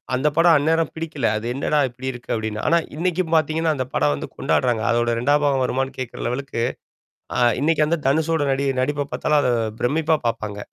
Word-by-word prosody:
அந்த 140 +4 +1
படம் 165 -1 +5
அந்நேரம் 160 +2 +1
பிடிக்கல. 155 -6 -2
அது 110 - -6
என்னடா 150 +2 0
இப்படி 130 +2 -8
இருக்கு 125 -1 -9
அப்டின்னு. 110 -1 -3
ஆனா 170 - +4 0.2
இன்னைக்கும் 175 0 -1
பாத்தீங்கன்னா, 160 0 +1
அந்த 130 -2 -2
படம் 75 0 +2
வந்து - - -6
கொண்டாடுறாங்க. 120 -4 +1
அதோட 120 0 +1
2ம் 145 +4 +2
பாகம் 135 -2 +2
வருமானான்னு 135 +2 -2
கேட்கற 130 -2 -5
லெவலுக்கு, 125 -1 -3 0.8
அ - - +2 0.2
இன்னைக்கு 155 0 +3
வந்த 170 +2 0
தனுஷோட 160 +1 +1
நடி 140 +1 0 0.2
நடிப்ப 145 +1 -1
பாத்தாலும் 150 -1 +2
அத 125 - +2 0.3
பிரமிப்பா 155 +5 +2
பாப்பாங்க. 105 -2 -4
140 Hz, 180 wpm, -22 LUFS, 125-160 Hz, 0.8 s, படம்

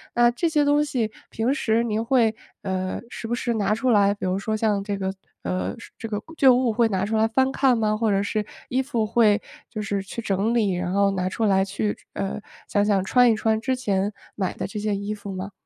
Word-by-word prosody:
那 240 0 +5
这 335 +8 0
些 305 -2 +2
东 290 +1 +3
西 235 -7 -1 0.2
平 235 +5 0
时 230 -5 +1
您 220 -2 -1
会， 235 -3 +3 0.3
呃， 185 -1 -3
时 225 - -7
不 240 - 0
时 240 -1 -1
拿 210 -1 +1
出 255 +3 0
来， 200 -3 +4
比 205 - -6
如 185 +1 0
说 215 +2 -2
像 210 -2 +1
这 200 0 -2
个 190 -1 -2 0.3
呃， 90 +2 -2 0.2
这 225 - -6
个 210 -1 -3 0.2
旧 265 -2 +7
物 250 -2 +2
会 235 +1 +3
拿 190 -2 0
出 220 +2 -2
来 220 +1 +3
翻 260 +4 +2
看 265 -2 +3
吗？ 215 -1 +1
或 220 0 +1
者 195 0 +2
是 210 +1 -1 0.2
衣 260 +1 +1
服 245 -5 -1
会 210 -2 +3 0.3
就 215 -2 -5
是 200 -1 -2
去 230 +4 -6
整 205 +2 0
理， 210 -5 +2
然 180 0 -2
后 200 0 +3
拿 185 -1 -1
出 225 +4 -1
来 190 -2 +3
去， 205 +2 -2 0.2
呃， 195 +2 -3 0.3
想 205 0 +2
想 200 -2 +2
穿 245 +2 +5
一 - - +2
穿 220 0 +1
之 260 +3 0
前 205 -4 0 0.2
买 190 -3 -1
的 - - -4
这 210 - -7
些 210 0 -1
衣 200 +1 -3
服 200 -1 -8
吗？ 190 +2 -5
215 Hz, 255 characters per minute, -24 LUFS, 200-235 Hz, 0.3 s, 旧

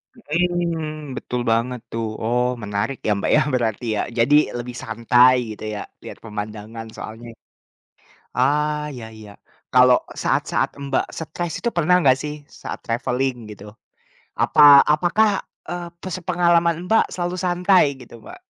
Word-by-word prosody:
Mhm, 165 - -2
betul 125 0 -3
banget 120 +2 0
tuh. 115 0 -2 0.2
Oh 120 +2 +1 0.2
menarik 105 +6 -2
ya - - +3
Mbak 100 - -1
ya 150 - +5
berarti 120 -1 -1
ya. - - +1 0.2
Jadi 120 +5 +4 0.2
lebih 120 0 -6
santai 120 +3 +4 0.2
gitu 105 - -12
ya, 100 - -5 0.2
lihat - - -8
pemandangan 110 +1 -7
soalnya. 115 +2 -8 1.1
Ah, 150 +3 +1
iya 120 -3 -8
iya. 105 -1 -12 0.4
Kalau 125 0 +6 0.3
saat-saat - - 0 0.2
Mbak 135 -1 0
stres 165 +1 -4
itu 240 - +2
pernah 170 +2 +4
nggak 130 -1 +5
sih, 150 0 -4 0.2
saat - - -7
traveling 125 +2 -1 0.2
gitu? 100 - -13 0.8
Apa - - +3 0.3
apakah, 180 +8 +2 0.4
eee, 175 0 -4
pes 185 -1 -5
pengalaman 170 -1 +3
Mbak 225 - +5
selalu 175 0 -3
santai 180 +1 +4 0.2
gitu, 120 - -14
Mbak? - - -11
135 Hz, 140 wpm, -21 LUFS, 115-170 Hz, 1.1 s, Kalau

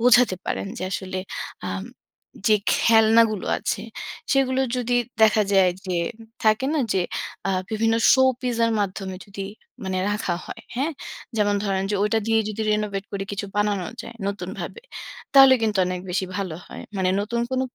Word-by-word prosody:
বোঝাতে 245 -4 +5
পারেন - - -2
যে - - -5
আসলে 185 -1 -3 0.5
আম - - -3 0.6
যে 215 - +6 0.2
খেলনাগুলো 225 -2 +4
আছে - - -2 0.5
সেগুলো 265 -1 +2 0.2
যদি 245 0 +1 0.3
দেখা 215 0 +6
যায় 190 -2 +5 0.2
যে 180 -1 -1 0.2
ম - - -10 0.2
থাকে 215 +5 +3
না 300 - +2
যে 185 - +2 0.5
আ - - +2 0.2
বিভিন্ন 225 +1 +2 0.5
শো-পিসের 235 -2 +1
মাধ্যমে 190 -1 -3
যদি 195 0 -6 0.4
মানে 185 -1 -1
রাখা 205 -4 -1
হয়। - - -8
হ্যাঁ? 285 +6 0 0.4
যেমন 205 -1 +2
ধরেন 195 -1 0
যে - - +1
ঐটা 210 +2 +2
দিয়েই 225 -1 +3
যদি 220 +1 -3
renovate 210 -2 -1
করে 195 0 -2
কিছু 200 0 -3
বানানো 205 -3 +1 0.2
যায় 235 - -10
নতুনভাবে। 200 - -5 0.5
তাহলে 270 -1 +9
কিন্তু 210 -3 +1
অনেক 180 0 -3
বেশি 190 +1 0
ভালো 190 -5 -3
হয়। - - -9
মানে 185 -1 +2
নতুন 235 +3 -2
কোন 260 0 0
210 Hz, 160 wpm, -24 LUFS, 195-230 Hz, 0.6 s, তাহলে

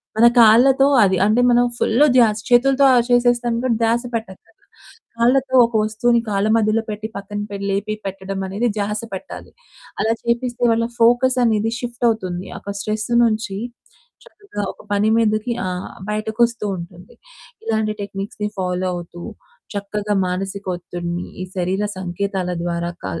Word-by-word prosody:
మన 225 +2 +5
కాళ్ళతో 255 +5 +6 0.2
అది 190 -2 +2
అంటే 215 +4 +3
మనం 245 0 +4
ఫుల్‌ 240 +7 +3
ద్య‌స్ 220 -4 +4
చేతులతో 270 +3 +4
అ - - +5
చేసేస్తాం 240 -1 +2
కాబట్టి 245 -3 0
ధ్యాస 230 +1 +2
పెట్టక్కర్లే. 220 -5 -7 0.5
కాళ్ళతో 260 +3 +2
ఒక 230 - -7
వస్తువుని 230 +2 +1
కాళ్ళ 200 0 0
మధ్యలో 220 0 +1
పెట్టి 215 +1 -4
పక్కన‌ 205 +1 -5
పే 200 - -5
లేపి 200 +2 -1
పెట్టడం 195 0 -5
అనేది 205 +6 -1
ధ్యాస 210 +1 -1
పెట్టాలి. 190 - -8 0.5
అలా 225 +1 +2
చేపిస్తే 240 +1 -1
వాళ్ళ 230 0 +1
ఫోకసనేది 235 -2 +3
షిప్టవుతుంది. 225 -7 -2
ఒక 200 - -6
స్ట్రెస్ 215 +2 -3
నుంచి 215 -3 0 0.7
చక్కగా 410 - -8
ఒక - - -17
పని 205 +2 +2
మీదకి 215 +1 +1
ఆ! - - -1 0.4
బయటకొస్తూ 220 +2 0
ఉంటుంది. 175 +1 -11 0.5
ఇలాంటి 220 -1 0
టెక్నిక్స్‌ని 200 +1 -5
ఫాలో 180 0 -1
అవుతూ, 175 0 -8 0.5
చక్కగా 205 +1 -3
మానసిక 195 +2 -4
ఒత్తిడిని, 175 0 -5 0.2
ఈ - - -4
శరీర 185 +3 0
సంకేతాల 185 0 -3
ద్వారా 170 0 -2
క - - -5
215 Hz, 135 wpm, -20 LUFS, 195-235 Hz, 0.7 s, కాళ్ళతో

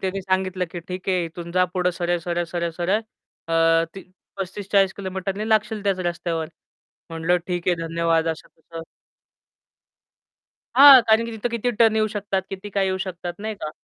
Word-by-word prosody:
त्यांनी 190 +1 -2
सांगितलं, 185 -1 -1
"की, 175 - -6
ठीक 180 +2 -7
आहे 180 -2 +1
इथून 170 +1 -8
जा 185 0 +3
पुढं 180 -1 +1
सरळ-सरळ, 175 0 -2
सरळ-सरळ 175 +3 -1 0.5
अ, 165 0 +3
ती 195 - -7 0.4
35-40 195 0 0
किलोमीटरनी 195 +2 -4
लागशील 215 -1 +1
त्याच 195 -2 0
रस्त्यावर." 170 -2 -2 0.6
म्हटलं, 165 +2 +1
"ठीक 175 -1 -2
आहे. 180 - +4
धन्यवाद!" 165 0 +1
असं-तसं. 165 +1 -7 1.9
हां 275 0 +10
कारण 220 +1 +4
की 230 - -5
तिथं 220 +2 -2
किती 235 +1 -1
टर्न 225 -1 +5
येऊ 215 0 +2
शकतात, 200 -2 -2
किती 195 +1 -6
काय 195 0 +1
येऊ 190 0 0
शकतात 180 -2 -5
नाही 215 +1 -4
का 155 - -4
185 Hz, 155 wpm, -23 LUFS, 170-200 Hz, 1.9 s, हां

